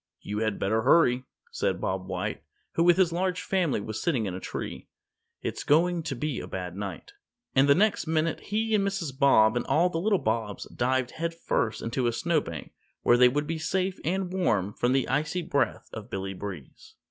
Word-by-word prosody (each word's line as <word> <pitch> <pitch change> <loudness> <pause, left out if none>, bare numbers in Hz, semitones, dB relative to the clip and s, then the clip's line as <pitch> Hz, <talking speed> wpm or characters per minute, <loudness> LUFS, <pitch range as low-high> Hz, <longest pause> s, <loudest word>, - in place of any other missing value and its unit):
"You 105 +1 -4
had 110 -2 0
better 110 +3 +1
hurry," 130 -2 +4 0.3
said - - -1
Bob 95 0 -2
White, - - -3 0.3
who 165 - +1
with 175 0 +5
his 180 -3 +3
large 185 +1 -1
family 180 - +1
was 110 +1 -5
sitting 135 -11 +1
in 95 - -3
a 90 - -5
tree, - - -6 0.6
"it's - - -3
going 170 +3 +3
to 145 -3 -4
be 145 +1 -2
a - - -7
bad 90 -2 -5
night," 100 - -6 0.4
and 135 +1 +4
the 140 - +7
next 205 -2 +2
minute 160 0 0
he 220 +2 -1
and 205 -2 +3
Mrs. 195 -9 -2
Bob 135 -6 +5
and 120 - 0
all 175 +3 +3
the 165 - -2
little 205 +1 +3
Bobs 110 - -2
dived 130 0 +1
headfirst 165 -9 -2
into 120 +2 -1
a - - +2
snowbank 145 - -2 0.3
where 120 - +5
they 125 0 +7
would 145 +4 -1
be 160 +1 -3
safe 185 +3 -1
and 185 +2 -1
warm 105 - +1
from 120 +3 +1
the 135 -2 +1
icy 155 +7 0
breath 140 -8 -1
of 110 +1 -8
Billy 95 -2 -4
Breeze. 90 -8 -9
140 Hz, 195 wpm, -27 LUFS, 110-175 Hz, 0.6 s, the